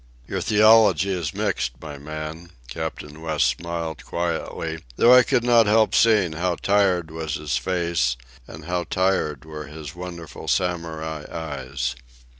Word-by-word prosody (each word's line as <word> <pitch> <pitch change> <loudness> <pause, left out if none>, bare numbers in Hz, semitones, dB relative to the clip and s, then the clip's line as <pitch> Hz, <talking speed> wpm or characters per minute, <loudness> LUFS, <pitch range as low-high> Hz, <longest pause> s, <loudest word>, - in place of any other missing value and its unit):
"Your - - -3
theology 105 -3 +5
is 85 -5 -2
mixed, - - -1
my 75 -2 -8
man," 75 +3 -7 0.2
Captain 80 0 -6
West 80 -2 +1
smiled 85 -3 -3
quietly, 80 -1 -3
though 120 - +6
I 125 - +9
could 120 - +1
not 120 -2 +5
help 110 +1 +4
seeing 105 -8 +4
how 85 +2 -1
tired 95 -5 +1
was 80 -2 -4
his 75 -3 -2
face 85 -4 0 0.3
and 80 -2 -10
how 90 0 -2
tired 85 -5 0
were 75 -1 -8
his 75 -1 -8
wonderful 85 -3 -8
Samurai 80 -4 -2
eyes. 70 -6 -4
80 Hz, 140 wpm, -23 LUFS, 75-90 Hz, 0.3 s, I